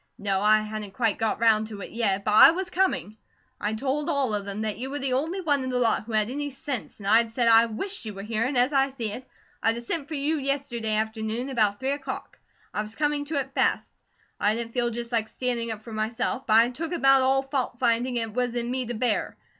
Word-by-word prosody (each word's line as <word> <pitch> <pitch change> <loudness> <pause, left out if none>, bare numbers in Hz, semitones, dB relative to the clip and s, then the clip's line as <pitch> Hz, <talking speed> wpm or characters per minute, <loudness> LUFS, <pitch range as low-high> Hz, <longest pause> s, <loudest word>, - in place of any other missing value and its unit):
"No, 195 -1 -1
I 215 +1 +5
hadn't 215 -2 -6
quite 230 -5 0
got 225 -2 0
round 220 -1 +3
to 210 -2 -8
it - - -8
yet; 200 -4 0
but 210 - +1
I 260 +6 +10
was 365 +2 -2
coming. 355 - 0 0.4
I'd 215 +1 -2
told 280 +4 -1
all 270 -6 +1
of 205 -1 -2
them 200 +1 -4
that 215 -1 -2
you 260 +2 -4
were 285 - -3
the 270 -2 -1
only 320 +9 -1
one 290 -5 +1
in 260 - -3
the 250 - -1
lot 230 -3 +1
who 230 - -7
had 215 +2 +1
any 290 +2 -3
sense; 270 -3 -6
and 200 - -11
I'd 225 +3 +4
said 240 -1 +1
I 230 0 +7
WISHED 380 - -4
you 215 -2 -6
were 195 - -7
here, 220 +1 -1
and 260 +1 -1
as 250 +4 +3
I 270 0 +3
see 235 -6 -4
it, 255 +5 -8 0.3
I'd 225 +1 +2
a - - -5
sent 285 +4 -3
for 310 - -5
you 295 +2 0
yesterday 265 -6 -1
afternoon 220 +3 -2
about 215 -5 +1
three 265 +1 -1
o'clock. 280 -1 -6 0.3
I - - -1
was 215 +1 -7
coming 295 0 0
to 310 +2 -4
it 270 -1 -2
fast. - - +1 0.5
I 210 +1 +2
didn't 230 0 -4
feel 240 -1 +1
just 235 +1 -5
like 225 -2 0
standing 240 -2 -2
up 215 -1 -5
for 225 - -9
myself; 220 +4 -2
but 215 - +3
I'd 235 +2 +5
took 330 +6 -4
about 270 -5 +5
all 265 +1 +2
fault 270 -3 -2
finding 245 +1 +1
it 225 -2 -2
was 245 0 -1
in 240 0 -1
me 255 -1 -2
to 240 - -3
bear. 240 +3 -1
235 Hz, 250 wpm, -26 LUFS, 220-270 Hz, 0.5 s, I